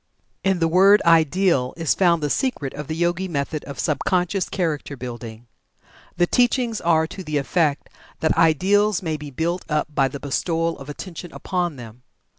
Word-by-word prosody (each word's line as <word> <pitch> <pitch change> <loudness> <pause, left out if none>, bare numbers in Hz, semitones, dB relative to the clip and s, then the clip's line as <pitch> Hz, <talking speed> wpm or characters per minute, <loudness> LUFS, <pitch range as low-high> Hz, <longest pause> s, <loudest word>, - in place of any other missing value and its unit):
In 190 -1 +2
the 165 -1 +2
word 195 +5 +6
"ideal" 165 -4 +3
is 165 -3 +1
found 170 -4 +2
the 145 - 0
secret 250 - -1
of 150 -1 -7
the 160 - -3
Yogi 175 +3 0
method 150 -1 -3
of 140 - -8
sub 150 -4 -1
conscious 180 +1 0
character 155 -6 -2
building. 120 -2 -8 0.7
The 175 - +4
teachings 240 +1 +1
are 160 -1 +3
to 185 +4 -8
the 155 -3 -2
effect 150 +1 0 0.3
that 160 - +1
"ideals" 195 +5 +3
may 160 -2 -1
be 150 -1 -7
built 170 +6 -2
up 150 0 -1
by 135 -2 +3
the 140 +2 -7
bestowal 165 +4 -1
of 135 +1 -10
attention 170 +2 -8
upon 175 -4 -2
them. 120 -1 -11
165 Hz, 175 wpm, -22 LUFS, 145-180 Hz, 0.7 s, word